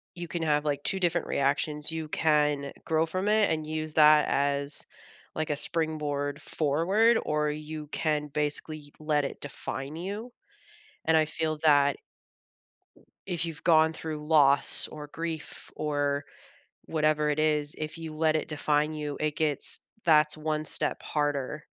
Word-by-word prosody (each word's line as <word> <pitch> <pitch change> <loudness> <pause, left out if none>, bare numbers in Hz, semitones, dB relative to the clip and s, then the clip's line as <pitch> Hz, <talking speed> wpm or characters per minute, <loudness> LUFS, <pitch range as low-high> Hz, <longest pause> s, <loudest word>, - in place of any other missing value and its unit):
you 175 0 -6
can 165 +2 -4
have, 150 -1 +1
like, 145 -1 -1
2 190 - -1
different 175 -1 0
reactions, 150 +2 0
you 160 -1 -4
can 150 -3 +1
grow 160 0 +2
from 185 +5 -3
it 210 -2 +3
and 155 -1 -2
use 155 0 -4
that 150 -1 +6
as, 140 +1 0 0.5
like, 155 0 -2
a 150 - +1
springboard 150 -2 -2
forward, 185 +13 +2
or 150 0 0
you 155 0 -7
can 150 -1 -1
basically 150 0 -3
let 150 -2 +1
it - - -6
define 140 0 -5
you. 205 +8 -6 0.7
And 160 - +3
I 155 - +4
feel 155 0 -2
that 145 -2 +4 1.3
if 175 -3 -2
you've 160 -3 -7
gone 160 -1 +5
through 155 -2 -6
loss 145 -3 +5
or 150 -1 -8
grief 160 0 -6
or 145 -1 -1 0.6
whatever 155 -1 +1
it 150 0 0
is, 150 -1 +1
if 155 +1 -5
you 160 -1 -7
let 155 0 +1
it 155 - -1
define 150 0 0
you, 150 -2 -4
it 150 -1 -1
gets 150 -3 +1 0.3
that's 150 -2 +4
one 155 0 -2
step - - 0
harder 145 0 -2
155 Hz, 150 wpm, -28 LUFS, 150-160 Hz, 1.3 s, that